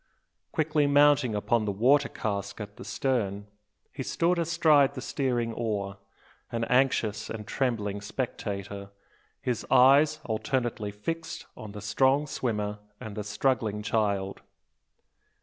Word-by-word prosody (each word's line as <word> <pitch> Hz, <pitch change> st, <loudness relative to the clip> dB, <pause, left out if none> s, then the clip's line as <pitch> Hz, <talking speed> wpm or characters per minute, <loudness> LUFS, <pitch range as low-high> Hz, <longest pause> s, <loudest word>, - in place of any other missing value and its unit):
Quickly 155 Hz, -2 st, +1 dB
mounting 145 Hz, -4 st, +4 dB
upon 110 Hz, +2 st, +1 dB
the 105 Hz, -, 0 dB
water 130 Hz, +8 st, +3 dB
cask 100 Hz, -1 st, -4 dB
at 105 Hz, -1 st, -8 dB
the -, -, -8 dB
stern, 105 Hz, -7 st, -1 dB, 0.5 s
he -, -, -5 dB
stood 170 Hz, +1 st, +1 dB
astride 155 Hz, -4 st, +4 dB
the -, -, -4 dB
steering 120 Hz, -4 st, -1 dB
oar, 100 Hz, -4 st, -3 dB, 0.5 s
an 115 Hz, -1 st, -1 dB
anxious 120 Hz, -4 st, +1 dB
and 110 Hz, -2 st, -6 dB
trembling 105 Hz, -6 st, -1 dB
spectator, 100 Hz, -3 st, -4 dB, 0.5 s
his 125 Hz, -3 st, -1 dB
eyes 140 Hz, +4 st, +6 dB
alternately 115 Hz, -1 st, -1 dB
fixed 160 Hz, +11 st, -5 dB
on 105 Hz, -2 st, -9 dB
the 105 Hz, -, -7 dB
strong 130 Hz, +8 st, +2 dB
swimmer 105 Hz, -7 st, -2 dB, 0.2 s
and 110 Hz, -2 st, -7 dB
the 105 Hz, -, -3 dB
struggling 105 Hz, -1 st, 0 dB
child. 100 Hz, -3 st, 0 dB
115 Hz, 125 wpm, -28 LUFS, 105-135 Hz, 0.5 s, eyes